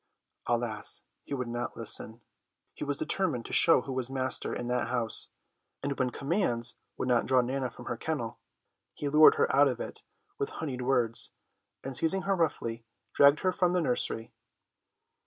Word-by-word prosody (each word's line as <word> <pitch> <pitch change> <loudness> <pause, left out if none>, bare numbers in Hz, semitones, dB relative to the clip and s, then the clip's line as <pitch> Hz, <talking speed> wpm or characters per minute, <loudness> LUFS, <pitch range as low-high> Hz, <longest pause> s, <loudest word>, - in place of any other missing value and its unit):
Alas, 120 -3 -1 0.2
he 140 - -5
would 125 -2 -3
not 120 +1 -4
listen. 115 0 0 0.5
He - - -6
was - - -1
determined - - 0
to - - -7
show - - +6
who 135 - -6
was 130 -1 -2
master 130 -1 -1
in 120 - -4
that 125 0 -1
house, 115 -3 -1 0.5
and 140 - -1
when 130 -1 +2
commands 125 - 0 0.2
would - - -2
not 120 -2 +2
draw 130 -1 +4
Nana 130 +1 -2
from - - -12
the - - -3
kennel, - - -4 0.6
he 145 - -3
lured 155 +2 +7
her - - +1
out 145 +1 +6
of 130 - -2
it - - -7 0.4
with 140 - -1
honeyed 135 -5 -5
words, 125 -3 +1 0.5
and 135 -1 -5
seizing 165 +8 +2
her 195 0 +1
roughly, 115 -9 -1 0.3
dragged 140 +1 +5
her 185 - +2
from 180 -1 +1
the 180 - +2
nursery. 125 -6 -1
130 Hz, 175 wpm, -29 LUFS, 120-140 Hz, 0.6 s, lured